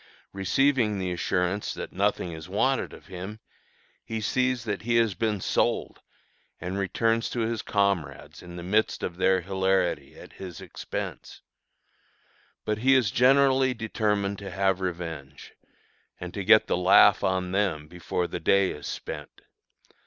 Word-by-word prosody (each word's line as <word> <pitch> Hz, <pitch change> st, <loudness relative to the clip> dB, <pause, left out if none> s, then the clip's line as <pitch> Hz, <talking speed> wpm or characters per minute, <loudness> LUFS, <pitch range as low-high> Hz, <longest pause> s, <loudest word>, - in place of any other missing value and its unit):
Receiving 110 Hz, +2 st, +2 dB
the 95 Hz, -1 st, -2 dB
assurance 90 Hz, +2 st, -1 dB
that -, -, -7 dB
nothing 100 Hz, -2 st, 0 dB
is 80 Hz, -1 st, -9 dB
wanted -, -, +1 dB
of -, -, -13 dB
him, 95 Hz, +4 st, -8 dB, 0.6 s
he 110 Hz, 0 st, -4 dB
sees 125 Hz, +3 st, 0 dB
that 105 Hz, -4 st, -3 dB
he 120 Hz, +1 st, 0 dB
has 115 Hz, -3 st, +3 dB
been 105 Hz, +2 st, -1 dB
"sold," -, -, 0 dB, 0.6 s
and 90 Hz, +3 st, -4 dB
returns 115 Hz, +4 st, 0 dB
to 120 Hz, -, -2 dB
his 115 Hz, 0 st, -1 dB
comrades 100 Hz, -5 st, -1 dB
in 85 Hz, 0 st, -10 dB
the 85 Hz, -, -7 dB
midst 105 Hz, +5 st, 0 dB
of 90 Hz, -, -4 dB
their 95 Hz, 0 st, +3 dB
hilarity 95 Hz, -6 st, 0 dB
at -, -, -13 dB
his 90 Hz, -4 st, -9 dB
expense. -, -, -7 dB, 1.2 s
But 105 Hz, 0 st, -1 dB
he 135 Hz, +3 st, +4 dB
is 120 Hz, -7 st, +3 dB
generally 130 Hz, +1 st, +4 dB
determined 105 Hz, -3 st, -1 dB
to 100 Hz, -1 st, -7 dB
have 95 Hz, 0 st, 0 dB
revenge, 80 Hz, -6 st, -6 dB, 0.7 s
and 90 Hz, 0 st, -7 dB
to 100 Hz, -, -4 dB
get 110 Hz, +3 st, +6 dB
the -, -, 0 dB
"laugh" 95 Hz, +2 st, +6 dB
on 95 Hz, -1 st, 0 dB
them 95 Hz, -7 st, 0 dB
before 90 Hz, +1 st, -3 dB
the -, -, -5 dB
day 100 Hz, -1 st, +3 dB
is 75 Hz, -, -7 dB
spent. -, -, -7 dB
100 Hz, 150 wpm, -26 LUFS, 90-110 Hz, 1.2 s, get